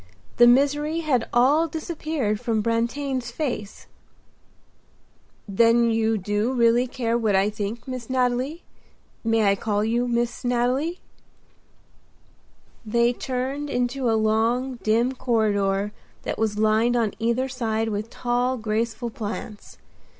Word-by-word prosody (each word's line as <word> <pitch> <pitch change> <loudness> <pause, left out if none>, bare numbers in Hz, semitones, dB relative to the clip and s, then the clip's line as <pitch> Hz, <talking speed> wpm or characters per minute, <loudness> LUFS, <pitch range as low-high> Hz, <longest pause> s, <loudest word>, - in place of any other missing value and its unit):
The 240 - +7
misery 290 +5 +3
had 260 -8 0
all 285 +7 +4
disappeared 310 - -3
from 225 -3 -1
Brantain's 240 +3 -1
face. 240 -6 -4 1.6
"Then 230 +3 +4
you 225 0 +1
do 205 +5 -1
really 240 0 +3
care 235 -2 -2
what 220 -4 +1
I 195 +2 +2
think, 215 +4 -5
Miss 255 -2 -6
Nathalie? 255 +5 0 0.6
May 225 -1 +2
I 200 - +5
call 205 +1 -1
you 240 +2 0
Miss 240 +1 -1
Nathalie?" 250 +8 0 1.8
They 235 +2 +2
turned 265 +4 -3
into 250 0 -1
a 225 - +2
long, 230 +4 +1
dim 230 +4 +2
corridor 210 -5 0 0.3
that - - -4
was 215 -2 0
lined 220 +3 +2
on 225 -4 +1
either 235 +3 0
side 225 -4 -2
with 210 +1 -3
tall, 245 +2 -1
graceful 225 +1 -2
plants. 215 -2 -7
235 Hz, 120 wpm, -24 LUFS, 220-255 Hz, 1.8 s, The